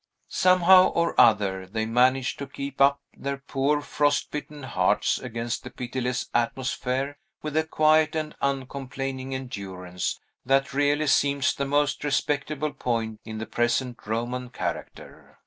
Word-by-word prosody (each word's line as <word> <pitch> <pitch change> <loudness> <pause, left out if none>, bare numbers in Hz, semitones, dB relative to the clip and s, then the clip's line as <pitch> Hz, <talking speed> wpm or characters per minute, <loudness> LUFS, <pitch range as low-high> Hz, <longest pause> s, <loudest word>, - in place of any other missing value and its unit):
Somehow 185 0 +6
or 170 0 0
other, 95 -4 +3
they 110 +3 -2
managed 125 +3 +2
to 140 - -5
keep 140 0 -6
up 140 +1 +5 0.2
their 140 0 -3
poor, 140 +2 0
frost 145 0 0
bitten 150 -1 -6
hearts 95 -8 +1
against 115 +1 -4
the 125 - -7
pitiless 125 0 -3
atmosphere 130 +3 -1 0.2
with 155 -1 -4
a 160 0 +2
quiet 155 0 +3
and 155 -1 -2
uncomplaining 135 -1 -3
endurance 95 -8 -5 0.2
that 135 +1 +2
really 145 +2 +2
seems 140 -1 +2
the 140 - -2
most 145 +1 +1
respectable 145 +1 -1
point 115 -5 -2
in 110 -1 -6
the 110 - -4
present 120 0 -1
Roman 120 +3 -2
character. - - -6
135 Hz, 135 wpm, -26 LUFS, 120-145 Hz, 0.2 s, Somehow